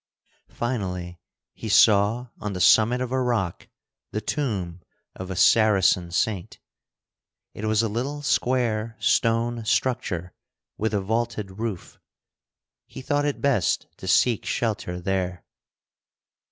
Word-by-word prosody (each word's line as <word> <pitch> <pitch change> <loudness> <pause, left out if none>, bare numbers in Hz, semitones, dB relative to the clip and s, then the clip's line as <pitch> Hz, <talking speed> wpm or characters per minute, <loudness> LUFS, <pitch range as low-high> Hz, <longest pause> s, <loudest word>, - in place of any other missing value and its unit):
Finally 90 -7 -4 0.3
he 110 - -7
saw 105 +3 +4
on 105 -1 -4
the 90 - -4
summit 115 +6 +5
of 125 -1 -3
a 130 0 +1
rock 115 -9 -1 0.4
the 105 - -3
tomb 100 - -3 0.3
of 95 0 -7
a 95 - -4
Saracen 95 -4 +4
saint. 95 +1 -2 1.0
It 110 - -6
was 110 +1 +2
a - - +1
little 135 +7 -3
square 115 -5 0
stone 115 0 +1
structure 90 -7 -1 0.4
with 110 0 -1
a 100 - +1
vaulted 110 -2 -3
roof. 110 -6 -5 0.9
He - - -10
thought 145 +2 0
it 145 - -2
best 135 - +1
to - - -9
seek 120 -4 +3
shelter 100 -6 -2
there. 90 -1 -2
110 Hz, 125 wpm, -24 LUFS, 95-120 Hz, 1.0 s, summit